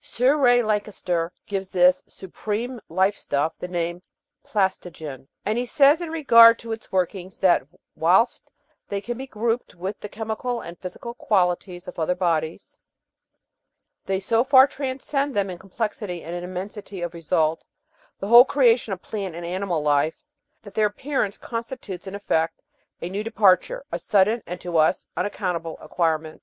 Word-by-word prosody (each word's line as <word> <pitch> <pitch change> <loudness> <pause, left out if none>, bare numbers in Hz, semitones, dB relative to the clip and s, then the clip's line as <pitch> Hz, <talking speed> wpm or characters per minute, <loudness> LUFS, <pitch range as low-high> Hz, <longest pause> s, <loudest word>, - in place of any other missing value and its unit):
Sir 255 +4 +2
Ray 245 -4 +4
Lankester 200 -6 -1 0.2
gives 195 -2 -4
this 180 0 +4
"supreme 215 +6 -5
life 190 +2 +2
stuff" 150 -1 -1
the - - -5
name 175 0 -3 0.4
"plastogen," 170 - -3 0.2
and 215 +3 0
he 245 - -1
says 285 +5 +5
in 340 - -4
regard 230 -8 +7
to 230 - -8
its 225 0 -6
workings 185 0 -2
that 175 -8 +3 0.3
"whilst 185 +9 +2 0.4
they 200 - -2
can 240 +4 -5
be 265 +3 -7
grouped 230 -1 -2
with 190 +4 -5
the 210 - -7
chemical 225 +3 -3
and 170 -3 -9
physical 190 +6 -7
qualities 180 -5 0
of 180 - -8
other 165 +3 +1
bodies, 165 -3 -2 1.3
they 190 0 0
so 225 +4 +2
far 265 0 +7
trans 270 -2 -5
cend 280 -1 -1
them 200 -2 0
in 175 - -8
complexity 195 -2 -4
and 170 - -6
in 175 - -5
immensity 190 +1 -6
of 175 0 -4
result 160 -1 0 0.5
the 195 - -5
whole 235 +3 +10
creation 245 -6 +3
of 185 - -8
plant 195 -6 -5
and 170 0 -6
animal 180 -3 -2
life 150 - +1 0.4
that 205 -2 -12
their 215 0 +3
appearance 215 -1 -2
con 230 -1 -4
stitutes, 210 -6 -8
in 190 - -6
effect, 165 -5 -1 0.4
a - - -2
new 195 +4 -3
departure, 225 - +2
a - - -2
sudden, 210 +3 +2
and 180 +1 -5
to 175 -2 -2
us, 155 0 +3
unac 205 - -2
countable 170 -4 -3
acquirement. 160 -1 -1
195 Hz, 165 wpm, -24 LUFS, 175-230 Hz, 1.3 s, whole